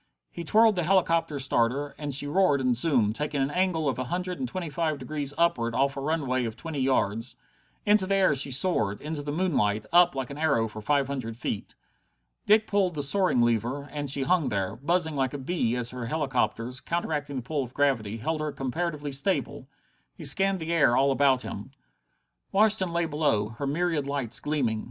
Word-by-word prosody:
He 170 Hz, -, -7 dB
twirled 220 Hz, +5 st, +4 dB
the 180 Hz, -, 0 dB
helicopter 165 Hz, -3 st, +1 dB
starter, 135 Hz, +1 st, 0 dB
and 145 Hz, -1 st, -4 dB
she 140 Hz, +2 st, +2 dB
roared 145 Hz, -1 st, +2 dB
and 130 Hz, -2 st, +1 dB
zoomed, 120 Hz, -6 st, +3 dB
taking 150 Hz, +1 st, -2 dB
an 135 Hz, +1 st, 0 dB
angle 175 Hz, -3 st, 0 dB
of 130 Hz, -, -1 dB
a 130 Hz, -, -2 dB
hundred 180 Hz, +5 st, -3 dB
and 255 Hz, -, -2 dB
twenty 185 Hz, -5 st, -5 dB
five 155 Hz, 0 st, -1 dB
degrees 145 Hz, -1 st, -4 dB
upward 120 Hz, -9 st, +1 dB
off 140 Hz, +2 st, +1 dB
a 135 Hz, -, -5 dB
runway 135 Hz, -4 st, -1 dB
of 110 Hz, -1 st, -5 dB
twenty 160 Hz, +1 st, -6 dB
yards. 120 Hz, -3 st, 0 dB, 0.5 s
Into 210 Hz, -2 st, +3 dB
the 195 Hz, -, +1 dB
air 190 Hz, -6 st, +3 dB
she 140 Hz, 0 st, +2 dB
soared, 125 Hz, -, +1 dB
into 150 Hz, 0 st, -5 dB
the 145 Hz, 0 st, -5 dB
moonlight, 125 Hz, -, 0 dB
up 175 Hz, -4 st, +5 dB
like 135 Hz, -1 st, -4 dB
an 140 Hz, -, -8 dB
arrow 140 Hz, -8 st, +2 dB
for 110 Hz, 0 st, -9 dB
five 140 Hz, +4 st, +1 dB
hundred 130 Hz, -5 st, -5 dB
feet. 110 Hz, -4 st, -5 dB, 0.7 s
Dick 215 Hz, +1 st, +5 dB
pulled 195 Hz, -5 st, 0 dB
the 145 Hz, -, -1 dB
soaring 180 Hz, -4 st, +2 dB
lever, 120 Hz, +4 st, 0 dB
and 145 Hz, -1 st, -3 dB
she 140 Hz, 0 st, +2 dB
hung 165 Hz, +1 st, +1 dB
there, 100 Hz, 0 st, -2 dB
buzzing 160 Hz, +5 st, 0 dB
like 135 Hz, -1 st, -1 dB
a -, -, -2 dB
bee 130 Hz, -4 st, -1 dB
as 120 Hz, -1 st, -1 dB
her 125 Hz, -2 st, -6 dB
helicopters, 125 Hz, -4 st, -1 dB
counteracting 150 Hz, -4 st, -3 dB
the 130 Hz, -, -4 dB
pull 145 Hz, +3 st, -2 dB
of 125 Hz, -1 st, -8 dB
gravity, 115 Hz, -7 st, 0 dB
held 155 Hz, +7 st, -2 dB
her 155 Hz, -1 st, -2 dB
comparatively 145 Hz, +2 st, -3 dB
stable. 140 Hz, +8 st, -1 dB, 0.5 s
He -, -, -10 dB
scanned 195 Hz, -1 st, +3 dB
the 165 Hz, +1 st, -3 dB
air 145 Hz, -7 st, +4 dB
all 140 Hz, +1 st, +3 dB
about 135 Hz, -2 st, +2 dB
him. 105 Hz, +6 st, -7 dB, 0.8 s
Washington 200 Hz, -3 st, +4 dB
lay 170 Hz, 0 st, 0 dB
below, 145 Hz, -10 st, 0 dB
her 120 Hz, +5 st, -5 dB
myriad 155 Hz, -1 st, -1 dB
lights 140 Hz, -5 st, 0 dB
gleaming. 130 Hz, -8 st, -1 dB
145 Hz, 200 wpm, -27 LUFS, 125-170 Hz, 0.8 s, up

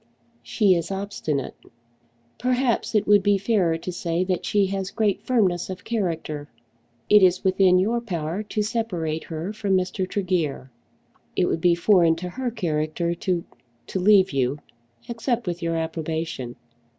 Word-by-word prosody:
"She 155 Hz, -, +2 dB
is 170 Hz, -2 st, -1 dB
obstinate. 195 Hz, -8 st, -3 dB, 0.9 s
Perhaps 250 Hz, -2 st, 0 dB
it 210 Hz, -, +3 dB
would 205 Hz, -1 st, +5 dB
be 205 Hz, 0 st, +3 dB
fairer 190 Hz, -5 st, +1 dB
to 175 Hz, +2 st, -5 dB
say 170 Hz, 0 st, -1 dB
that 185 Hz, -1 st, -2 dB
she 205 Hz, -1 st, +3 dB
has 195 Hz, 0 st, -3 dB
great 210 Hz, -2 st, 0 dB
firmness 190 Hz, -9 st, +1 dB
of 185 Hz, -, -6 dB
character. 165 Hz, -9 st, -3 dB, 0.6 s
It 210 Hz, 0 st, +7 dB
is 185 Hz, -1 st, +4 dB
within 190 Hz, -1 st, +4 dB
your 225 Hz, +6 st, +1 dB
power 175 Hz, -4 st, -3 dB
to 215 Hz, 0 st, -2 dB
separate 180 Hz, -9 st, -2 dB
her 165 Hz, +5 st, -5 dB
from 200 Hz, -3 st, +1 dB
Mr. 185 Hz, 0 st, -2 dB
Tregear. 170 Hz, -9 st, -2 dB, 0.6 s
It 180 Hz, -, +2 dB
would 165 Hz, -, -1 dB
be 175 Hz, 0 st, +4 dB
foreign 170 Hz, -2 st, +4 dB
to 180 Hz, +2 st, -6 dB
her 255 Hz, +7 st, -3 dB
character 170 Hz, -5 st, -1 dB
to 175 Hz, 0 st, -1 dB, 0.4 s
to 190 Hz, -, -3 dB
leave 195 Hz, 0 st, +5 dB
you, 135 Hz, +1 st, 0 dB, 0.5 s
except 235 Hz, 0 st, -2 dB
with 175 Hz, -1 st, -3 dB
your 165 Hz, 0 st, -1 dB
approbation." 160 Hz, -5 st, -3 dB
185 Hz, 150 wpm, -24 LUFS, 165-205 Hz, 0.9 s, It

